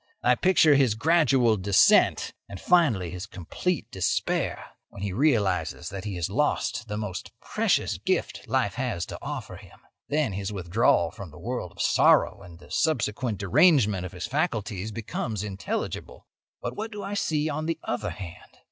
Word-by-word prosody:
I 125 - +5
picture 160 +1 +4
his 135 -6 +3
gradual 135 -5 +3
descent, 95 0 +4 0.2
and, 100 -1 -8
finally, 120 - +2
his 90 +1 -6
complete 120 - -3
despair 95 - -1 0.2
when 100 - -9
he 100 -2 -2
realises 100 - +1
that 100 +1 -7
he 100 -3 -4
has 85 -2 -1
lost 120 0 -1
the 105 -1 -4
most 105 -4 -5
precious - - 0
gift - - -2
life - - +1
had 85 - -2
to - - -5
offer - - -6
him. - - -16 0.3
Then 145 -7 +1
his 100 +1 -3
withdrawal 95 +3 +2
from 100 -6 -9
the 75 - -14
world 100 -1 -4
of - - -4
sorrow - - +4
and 85 -1 -12
the - - -17
subsequent 120 -6 0
derangement 105 - +4
of 90 - -7
his - - -5
faculties 105 -1 -2
becomes 110 -1 -4
intelligible. 100 -2 -5 0.4
"But - - -3
what 220 +2 -5
do 205 -2 -6
I 200 +1 -4
see 155 -6 0
on 155 +1 -3
the 165 - -1
other 120 - -2
hand? 90 -3 -10
105 Hz, 165 wpm, -26 LUFS, 95-145 Hz, 0.4 s, I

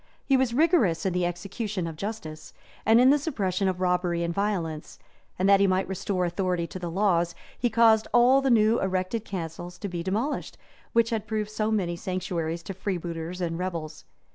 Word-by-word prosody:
He 275 - +3
was 260 -2 +2
rigorous 250 - +3
in 190 - +1
the 180 -1 +1
execution 195 +2 -4
of 165 -1 -5
justice, 160 -5 -6 0.3
and 225 +1 +6
in 255 +2 +7
the 295 - +4
suppression 200 - -1
of 185 -1 -1
robbery 180 -2 +1
and 170 0 -1
violence; 170 -6 -2 0.4
and 185 - +1
that 200 0 +6
he 200 - +4
might 185 0 +1
restore 190 -1 -1
authority 180 -1 -1
to 185 - -8
the 175 -1 -4
laws, 170 -2 +1 0.2
he 245 - 0
caused 225 -1 +4
all 250 +3 +5
the 270 - +1
new 225 -1 +4
erected 190 +3 -1
castles 175 -2 -6
to 200 - -5
be 175 -3 -4
demolished, 215 - -2 0.4
which 230 0 +3
had 220 -2 -2
proved 215 -1 -2
so 215 0 -1
many 185 -6 0
sanctuaries 170 -2 -3
to 195 - -6
freebooters 175 -2 -4
and 165 -1 -2
rebels. 165 -4 -5
185 Hz, 190 wpm, -26 LUFS, 175-220 Hz, 0.4 s, in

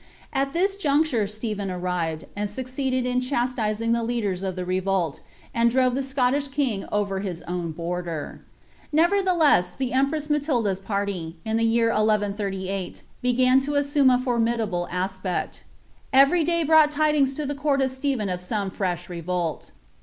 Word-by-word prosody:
At 275 0 0
lliil 390 +3 +1
juncture 285 - +2
Stephen 210 -1 -4
arrived, 180 -3 -2
uid 205 0 -2
lucceeded 260 0 -2
in 250 0 +1
chastising 240 -4 -1
the 235 0 +2
Ic&den 210 -6 -2
of 190 -2 -2
the 180 -1 -4
revolt, 185 -3 0 0.3
and 235 0 +3
drove 255 +1 +2
the 270 - 0
Scottish 270 +1 0
king 265 -8 -1
over 200 -2 0
his 185 -4 -5
own 175 -1 -3
border. 170 -1 -4 0.5
Nercrthelc« 340 - +3
the 260 -2 -2
empress 280 +3 +1
Matilda's 265 -10 0
parly, 195 -5 -3
in 220 0 0
the 230 - +1
year 230 0 +3
1 225 - +1
138, 200 -3 -2 0.2
began 255 +1 +4
to 285 +2 -3
assume 285 -1 +3
n 250 -1 +4
fbrm^ 235 -2 +1
dable 180 -6 -2
aspecL 185 0 -3 0.5
Every 275 +6 +5
day 335 +1 +1
brought 315 -1 +6
tidings 300 -2 +2
to 300 - -3
the 285 - -2
court 285 0 0
of 265 -1 +1
Stephej) 260 -5 -1
uf 180 -1 -3
aooe 200 -3 -2
fresh 180 -3 -2
revolt. 175 -1 -3
230 Hz, 160 wpm, -24 LUFS, 190-275 Hz, 0.5 s, brought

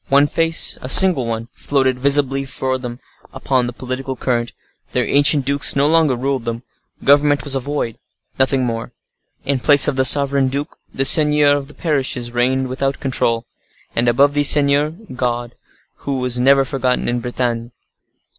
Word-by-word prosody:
One 140 +1 +4
face—a 165 -4 -1
single 170 -6 +5
one—floated 125 +3 -2
visibly 135 0 +1
for 130 -1 -3
them 120 -1 -8 0.3
upon 130 -2 -1
the - - -4
political 130 +2 -6
current. 120 -2 -2 0.4
Their - - 0
ancient 145 -1 +2
dukes 140 +1 +3
no 140 +1 +2
longer 160 -4 +2
ruled 130 0 -3
them; 115 +1 -5 0.4
government 145 0 +3
was 145 - 0
a 135 - +1
void—nothing 130 0 -3
more. 115 -1 -5 0.5
In 140 -1 -1
place 145 +2 +5
of 145 -3 -1
the 130 - +2
sovereign 140 0 +3
duke, 140 +4 -4 0.2
the 135 - -2
seigneurs 150 -1 +3
of - - -16
parishes 130 -6 -2
reigned 130 +2 0
without 135 +2 -3
control; 115 -3 -1 0.5
and, 120 +1 0
above 140 +5 +3
these 145 -1 +3
seigneurs, 145 +2 +2 0.2
God, 120 -1 -3 0.4
who 135 -2 -4
has 125 -1 -1
never 135 +2 +4
been - - -1
forgotten 130 -2 -1
in 120 0 -1
Bretagne. 120 -1 -3
135 Hz, 155 wpm, -17 LUFS, 125-140 Hz, 0.5 s, single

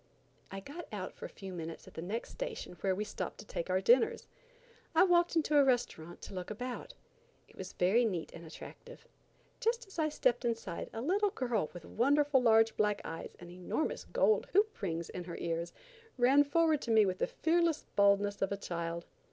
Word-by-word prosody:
I 195 0 -6
got 310 - -8
out 195 -3 -5
for - - -9
a - - -6
few 190 -2 -9
minutes 165 -1 -7
at - - -13
the 160 - -6
next 210 +7 -4
station - - -5
where 190 -1 +1
we 210 - -2
stopped 210 - -5
to 210 - -10
take 170 - -4
our 185 +1 +2
dinners. 240 +5 +4 0.7
I 325 - +7
walked 350 -2 +3
into 305 -2 +3
a - - +7
restaurant 240 -10 -1
to - - -8
look 180 -1 -5
about. 245 - -6 0.5
It - - -20
was - - -7
very 195 +7 +3
neat 185 -8 -2
and 170 - -10
attractive. 475 - -11 0.5
Just 470 0 0
as 390 -4 -10
I 310 -1 +2
stepped 250 -4 +1
inside 230 -7 -3
a 225 - -5
little 400 +7 +2
girl 240 - -1
with 175 -2 -10
wonderful 285 +3 +3
large 225 -1 +5
black 210 -1 +1
eyes 165 - -6
and 175 0 -10
enormous 245 - -2
gold 465 -3 +2
hoop 420 +3 +2
rings 165 -3 -2
in 180 -1 -6
her 170 - -6
ears, 170 0 -2 0.5
ran 270 +4 +5
forward 315 0 +2
to - - -6
me 220 -2 +6
with 185 -1 -2
the - - +1
fearless 335 -1 +1
boldness 200 0 +3
of 195 - +1
a 200 - -1
child. 170 -2 -4
225 Hz, 200 wpm, -33 LUFS, 185-300 Hz, 0.7 s, I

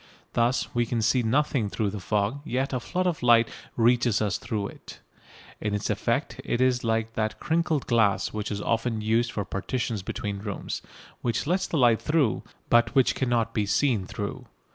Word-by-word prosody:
Thus 120 +1 +1
we 120 -1 +1
can 115 -1 -1
see 120 +3 +3
nothing 125 -1 +1
through 105 0 -1
the 105 - -5
fog, 105 +7 -1
yet 135 -2 -1
a 130 - 0
flood 185 +8 -2
of 175 -3 0
light 120 -2 +5 0.3
reaches 120 -2 +3
us 105 -3 0
through 105 -2 -3
it. - - -12 0.6
In 105 -1 -1
its 105 - -1
effect - - -1
it 120 - -1
is 130 -1 +2
like 115 0 0
that 110 -1 -2
"crinkled" 160 -3 0
glass 110 -4 +2
which 105 -1 -3
is 100 -1 -3
often 115 -1 0
used 115 +2 +1
for 100 - -3
partitions 110 +1 -2
between 100 0 -4
rooms, 100 0 -5 0.4
which 120 +3 -1
lets 185 +4 0
light 120 -8 +4
through, 150 -7 +1 0.3
but 120 +2 +3
which 135 -2 +4
cannot 120 -3 0
be 105 -2 0
seen 110 -3 +1
through. - - -5
115 Hz, 180 wpm, -26 LUFS, 105-130 Hz, 0.6 s, light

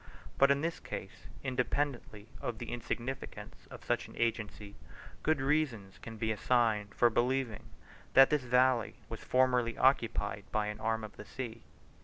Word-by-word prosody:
But 140 - +7
in 140 0 +3
this 165 +1 -2
case, 95 -7 -8 0.2
independently 125 -4 -2
of 120 - -3
the 120 0 -6
insignificance 120 +2 -5
of - - -11
such - - 0
an - - -14
agency, 105 -3 -2 0.5
good 155 -2 +2
reasons 130 -10 0
can 115 -1 -9
be 110 0 0
assigned 110 -2 +1
for 120 -1 +4
believing 125 -1 0 0.5
that 135 0 +8
this 150 -2 +3
valley 125 -2 +3
was - - -5
formerly 125 -2 +2
occupied 110 -6 +2
by 110 -1 +1
an 105 - -6
arm 110 0 -1
of 105 - -9
the 105 - -9
sea. 115 -2 -6
120 Hz, 155 wpm, -32 LUFS, 110-130 Hz, 0.5 s, that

